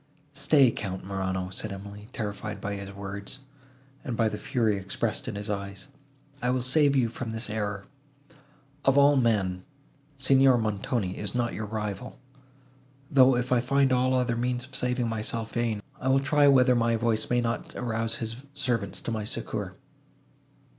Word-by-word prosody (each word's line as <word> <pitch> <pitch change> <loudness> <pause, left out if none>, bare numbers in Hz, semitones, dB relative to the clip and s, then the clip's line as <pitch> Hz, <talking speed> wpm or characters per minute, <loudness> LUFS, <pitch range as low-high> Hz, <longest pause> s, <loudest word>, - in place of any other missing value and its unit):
"Stay, 140 -2 +5
Count 95 -4 -4
Morano," 95 -1 -2
said 105 +3 -4
Emily, 100 +1 -8
terrified 105 -2 -4
by 100 0 -3
his 100 0 -6
words, 100 +5 -6 0.6
and 125 -6 -4
by 115 - +3
the 105 -1 -3
fury 110 -4 +1
expressed 105 +7 -2
in 115 - -4
his 100 +1 -4
eyes, 100 -2 -5 0.5
"I 125 - 0
will 125 -1 +1
save 140 +2 +3
you 125 -3 +3
from 120 +1 -5
this 110 0 -4
error.—Of 140 +6 -5
all 140 +1 +6
men, 100 -8 +1 0.5
Signor 135 -1 +5
Montoni 105 -2 -1
is 105 +2 -2
not 120 -1 0
your 105 0 -4
rival; 105 +2 -4 0.9
though, 130 -1 +6
if 125 +1 -2
I 125 -1 +4
find 135 +2 +2
all 130 +1 +3
other 125 -2 +1
means 125 +1 -1
of 130 0 -15
saving 125 -2 0
myself 115 0 -3
vain, 115 -3 -1 0.2
I 130 - -3
will 135 +1 +5
try 145 +2 +3
whether 130 -2 +6
my 115 -1 +2
voice 115 -1 +1
may 125 - +3
not 120 0 -3
arouse 115 -2 -1
his 115 0 -4 0.2
servants 120 -8 -1
to - - -4
my 110 -2 -2
succour." 105 - -3
115 Hz, 165 wpm, -27 LUFS, 105-130 Hz, 0.9 s, all